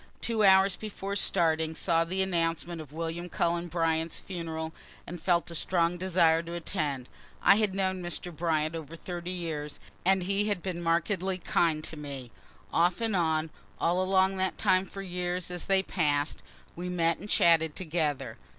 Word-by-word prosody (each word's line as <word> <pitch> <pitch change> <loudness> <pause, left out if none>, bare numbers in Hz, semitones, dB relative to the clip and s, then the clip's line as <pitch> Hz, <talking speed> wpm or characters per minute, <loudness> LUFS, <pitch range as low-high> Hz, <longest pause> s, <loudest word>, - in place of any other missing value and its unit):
Two 225 -2 0
hours 190 -1 +6
before 200 -2 -5
starting, 160 -5 +1
saw 165 -1 +2
the 185 +3 0
announcement 170 -2 -1
of 150 -3 -11
William 165 +2 -4
Cullen 170 0 0
Bryant's 165 -1 0
funeral, 160 -3 -5 0.3
and 175 -1 -7
felt 175 -1 +1
a - - -6
strong 170 +1 +1
desire 170 -3 +3
to 170 +1 -7
attend. 145 -6 -2 0.4
I 200 - +7
had 210 -3 +1
known 190 -1 0
Mr. 175 0 -5
Bryant 155 -1 0
over 160 0 -7
thirty 175 +1 -6
years 160 -5 -4
ago, - - -20 0.2
and 190 0 +4
he 200 +2 +1
had 205 -5 -1
been 180 -2 -3
markedly 180 +3 0
kind 165 -3 +1
to 160 - -6
me. 140 -5 -7 0.4
Off 175 +4 +3
and 225 -3 0
on, 160 -2 +1 0.3
along 190 +2 +2
that 190 -1 -1
time 185 +1 +3
for 195 - -7
years 180 -1 -3
as 175 -1 -3
they 195 -1 +3
pass'd, 150 -5 0 0.3
we 180 +1 -4
met 170 -2 +1
and 205 - -9
chatted 160 -4 +4
together. 155 -5 -2
170 Hz, 170 wpm, -29 LUFS, 160-185 Hz, 0.4 s, I